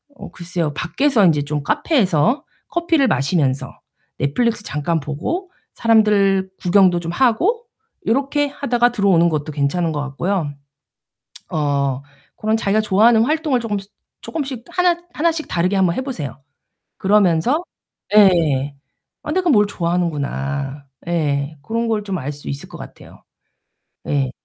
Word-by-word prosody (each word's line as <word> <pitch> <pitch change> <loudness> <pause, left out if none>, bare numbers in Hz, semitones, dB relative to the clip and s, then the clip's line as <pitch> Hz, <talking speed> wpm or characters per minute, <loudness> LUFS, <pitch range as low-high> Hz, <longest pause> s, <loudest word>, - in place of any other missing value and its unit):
어 - - -10
글쎄요. 170 -3 -3
밖에서 210 - +1
인제 150 -4 +3
좀 145 0 -3
카페에서 225 - +1 0.3
커피를 335 -5 +2
마시면서 140 - 0 0.4
넷플릭스 215 - 0
잠깐 160 +2 -1
보고 165 - -4 0.2
사람들 205 -4 +3
구경도 185 -1 +4
좀 165 0 -5
하고 330 - +2 0.4
요렇게 280 +4 +1
하다가 245 -4 +1
들어오는 195 -7 +3
것도 155 -1 -3
괜찮은 160 +4 0
것 145 - -2
같고요. 145 +2 -2 1.0
어 140 -3 0 0.3
고런 220 +1 0
자기가 215 0 +1
좋아하는 220 +3 +4
활동을 305 -3 +1
쪼끔씩 205 -3 -4 0.3
쪼끔씩 270 -6 -5
하나 360 -1 +2 0.2
하나씩 325 0 0
다르게 180 +3 0
한번 185 -3 +3
해 - - -1
보세요. 165 - -5 0.6
그러면서 205 - +2 0.5
예. 155 -9 +4 0.5
'아 - - -4
내가 365 -1 +1
뭘 210 -7 +4
좋아하는구나.' 145 -6 -2 0.2
예. 150 -3 -1
고런 230 +9 -2
걸 215 -2 0
좀 195 -2 -3
알 145 +1 -4
수 145 - -11
있을 140 +1 -6
것 - - -10
같아요. - - -13 0.8
예. 135 -3 0
190 Hz, 290 characters per minute, -19 LUFS, 150-235 Hz, 1.0 s, 구경도